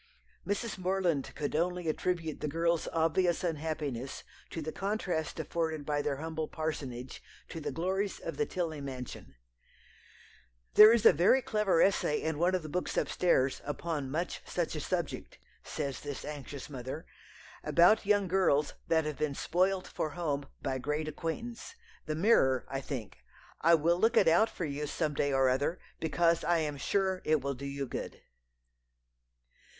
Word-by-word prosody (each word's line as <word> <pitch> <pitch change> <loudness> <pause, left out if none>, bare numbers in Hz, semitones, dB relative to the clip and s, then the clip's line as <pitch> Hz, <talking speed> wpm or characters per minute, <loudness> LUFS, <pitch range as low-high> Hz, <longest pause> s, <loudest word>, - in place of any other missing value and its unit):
Mrs. 205 0 -2
Morland 180 -6 0
could 145 - -3
only 180 +1 0
attribute 160 -1 -1
the - - -1
girl's 165 +2 0
obvious 165 +2 +1
unhappiness 150 -6 -3 0.3
to - - -5
the 155 0 -4
contrast 190 -5 -2
afforded 160 -3 -2
by 145 0 0
their 145 -1 -1
humble 160 +1 -4
parsonage 135 -6 -5 0.3
to 165 - -6
the 145 -1 -3
glories 190 +7 -1
of - - -5
the 445 -1 +1
Tilney 165 -5 -3
mansion, 125 - -7 1.4
"There 215 +1 +10
is 230 -1 +3
a - - +9
very 190 - +4
clever 210 -7 +3
essay 190 -6 +2
in 160 -2 -2
one 180 +2 +3
of 180 - -2
the - - -6
books 180 +4 -2
up - - +1
stairs, 140 -7 +2
upon 145 -1 -3
much 165 +6 -2
such 170 -2 -2
a - - -2
subject," 170 +1 -3 0.3
says 140 -3 -4
this 145 -2 -6
anxious 145 -2 -7
mother, 135 +3 -6 0.6
"about 175 +6 +5
young 205 -1 +2
girls 165 -6 +2
that 160 -1 +2
have 150 -1 -4
been 150 -2 -1
spoilt 185 +4 +1
for 155 - -3
home 145 -5 -1 0.2
by 130 -1 -1
great 150 +3 -2
acquaintance 165 - -5 0.3
The 155 - -1
Mirror, 155 - +3
I 135 +1 -3
think. 125 -8 -6 0.4
I 170 +1 +6
will 170 +3 +2
look 225 +3 +3
it - - +6
out 175 +8 +5
for 175 - -4
you 145 0 -3
some 150 0 -1
day 145 0 0
or 135 -1 +3
other, 140 +7 +1 0.2
because 165 +1 +2
I 175 - +3
am 150 -3 -2
sure 190 +4 0
it 155 -2 +2
will 140 +1 -2
do 140 +2 -6
you 140 0 -3
good." 125 - -6
160 Hz, 165 wpm, -31 LUFS, 145-180 Hz, 1.4 s, There